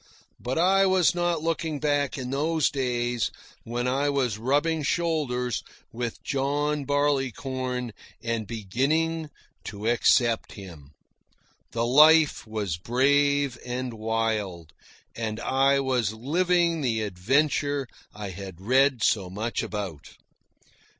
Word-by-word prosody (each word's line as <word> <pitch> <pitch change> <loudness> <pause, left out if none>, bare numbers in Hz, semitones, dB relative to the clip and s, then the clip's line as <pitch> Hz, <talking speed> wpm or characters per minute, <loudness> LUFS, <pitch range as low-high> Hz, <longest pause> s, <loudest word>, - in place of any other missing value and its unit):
But 125 +4 -3
I 190 +3 +4
was 185 -2 +3
not 175 -2 -1
looking 160 -2 -2
back 145 -1 0
in 130 -1 -5
those 155 +2 +1
days 120 -3 -1 0.4
when 120 +2 -2
I 140 +3 +1
was 125 -7 0
rubbing 145 +6 +1
shoulders 140 -7 -1 0.3
with 120 0 -5
John 145 +1 -1
Barleycorn 130 -3 -1 0.3
and 115 -2 -3
beginning 145 - -1 0.4
to 105 +1 -5
accept 120 -1 +2
him. 85 -9 -11 0.8
The 115 0 0
life 150 +2 +5
was 105 -7 -3
brave 140 +4 +2
and 125 0 -4
wild, 110 -7 -2 0.4
and 110 -1 -3
I 135 +3 +2
was 125 -6 0
living 170 +6 +1
the 115 -5 0
adventure 140 +8 0 0.2
I 105 -2 -7
had 95 -1 -9
read 130 +3 +2
so 95 -4 +2
much 110 +5 -3
about. 95 -9 -6
130 Hz, 115 wpm, -26 LUFS, 110-145 Hz, 0.8 s, life